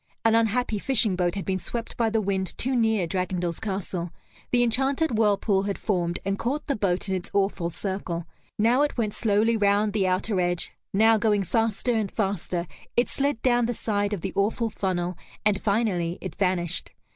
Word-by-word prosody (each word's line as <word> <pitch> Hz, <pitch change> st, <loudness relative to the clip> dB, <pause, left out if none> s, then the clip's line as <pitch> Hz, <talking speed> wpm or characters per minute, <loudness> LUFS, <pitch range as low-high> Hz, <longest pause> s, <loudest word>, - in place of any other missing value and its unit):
An 225 Hz, -, +5 dB
unhappy 225 Hz, 0 st, +2 dB
fishing 215 Hz, -5 st, +2 dB
boat 180 Hz, 0 st, 0 dB
had 195 Hz, -, -4 dB
been 190 Hz, -1 st, -1 dB
swept 230 Hz, +4 st, -5 dB
by 230 Hz, -2 st, +1 dB
the 220 Hz, 0 st, +1 dB
wind 190 Hz, -2 st, -2 dB
too 260 Hz, +1 st, 0 dB
near 220 Hz, -5 st, +2 dB
Dragondel's 180 Hz, -1 st, -2 dB
castle, 190 Hz, -4 st, -3 dB, 0.4 s
the 245 Hz, 0 st, +4 dB
enchanted 265 Hz, +4 st, +1 dB
whirlpool 205 Hz, -2 st, +2 dB
had 200 Hz, 0 st, -2 dB
formed, 175 Hz, -4 st, 0 dB
and 195 Hz, 0 st, -1 dB
caught 280 Hz, +5 st, -2 dB
the 280 Hz, -, 0 dB
boat 195 Hz, -2 st, 0 dB
in 190 Hz, -, -1 dB
its 185 Hz, -2 st, -3 dB
awful 195 Hz, -3 st, +1 dB
circle. 175 Hz, -1 st, -4 dB, 0.3 s
Now 235 Hz, +5 st, +3 dB
it 295 Hz, -2 st, 0 dB
went 215 Hz, -3 st, 0 dB
slowly 220 Hz, +1 st, +2 dB
round 205 Hz, 0 st, +2 dB
the 200 Hz, -3 st, +2 dB
outer 185 Hz, +2 st, 0 dB
edge, 175 Hz, 0 st, -1 dB, 0.2 s
now, 220 Hz, +2 st, +5 dB
going 210 Hz, -2 st, +2 dB
faster 225 Hz, +4 st, 0 dB
and 215 Hz, -4 st, -1 dB
faster, 190 Hz, -4 st, -1 dB, 0.3 s
it 240 Hz, -, +3 dB
slid 280 Hz, -4 st, -1 dB
down 240 Hz, -2 st, +3 dB
the 240 Hz, -, -2 dB
side 205 Hz, -2 st, -1 dB
of 205 Hz, -5 st, -3 dB
the 190 Hz, -, -4 dB
awful 220 Hz, +3 st, 0 dB
funnel, 180 Hz, -3 st, -2 dB, 0.3 s
and 205 Hz, -2 st, +3 dB
finally 200 Hz, -5 st, 0 dB
it 185 Hz, -4 st, -6 dB
vanished. 180 Hz, -2 st, -1 dB
205 Hz, 185 wpm, -26 LUFS, 185-225 Hz, 0.4 s, An